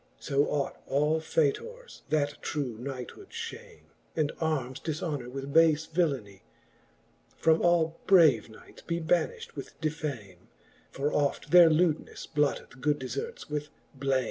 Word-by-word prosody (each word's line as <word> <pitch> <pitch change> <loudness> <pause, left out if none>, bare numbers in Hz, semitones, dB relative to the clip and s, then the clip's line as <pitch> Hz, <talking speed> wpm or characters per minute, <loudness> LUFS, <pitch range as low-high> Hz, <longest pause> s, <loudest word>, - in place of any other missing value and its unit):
So 140 0 +1
ought 140 -2 -2
all 150 +3 +2
faytours, 465 - -2
that 145 -2 0
true 140 -7 -3
knighthood 125 -1 -7
fhame. - - -8 0.3
And 155 -2 +1
armes 135 -6 -1
difhonour 150 -5 -3
with 135 +2 -6
bale 160 -2 +6 0.2
villanie, 135 - -1 1.0
From 160 0 +3
all 165 -2 +2
brave 155 - +6
knights 110 - -15
be 170 0 -2
banifht 460 - 0
vvith - - -8
defame: 135 - -4 0.4
For 145 +2 -2
oft 145 -1 0
their 175 -2 +9
lewdnes 160 0 +1
blotteth 145 -3 -1
good 150 +1 +2
deierts 130 +1 -5
with 150 0 -3 0.2
blame. 135 -1 +1
150 Hz, 130 wpm, -29 LUFS, 135-160 Hz, 1.0 s, their